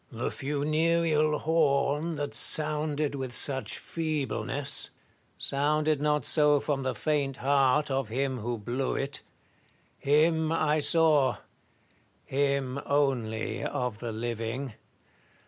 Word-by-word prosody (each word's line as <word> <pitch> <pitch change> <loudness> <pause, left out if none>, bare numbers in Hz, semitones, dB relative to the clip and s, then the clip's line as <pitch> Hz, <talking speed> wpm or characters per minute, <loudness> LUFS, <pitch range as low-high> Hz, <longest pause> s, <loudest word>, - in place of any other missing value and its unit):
Tlie 120 0 -3
funereal 155 +2 +1
horn, 150 0 +1
that 145 -1 -4
sounded 150 -1 +1
with 130 -3 -5
such 135 0 0
feebleness, 155 -5 -2 0.5
sounded 150 +1 0
not 150 0 +1
so 150 -2 +4
from 140 -1 -2
the 130 -1 -2
faint 145 -3 -1
heart 140 +1 +2
of 135 -4 -1
him 130 +2 -2
who 120 +2 -3
blew 120 +5 -2
it. 140 +1 -3 0.8
Him 160 +2 +2
I 155 -2 +1
saw; 150 -3 +4 0.9
him 140 -1 -1
only 120 -6 0
of 125 -6 -3
the 120 -1 -4
living. 115 +3 -4
140 Hz, 110 wpm, -28 LUFS, 130-150 Hz, 0.9 s, so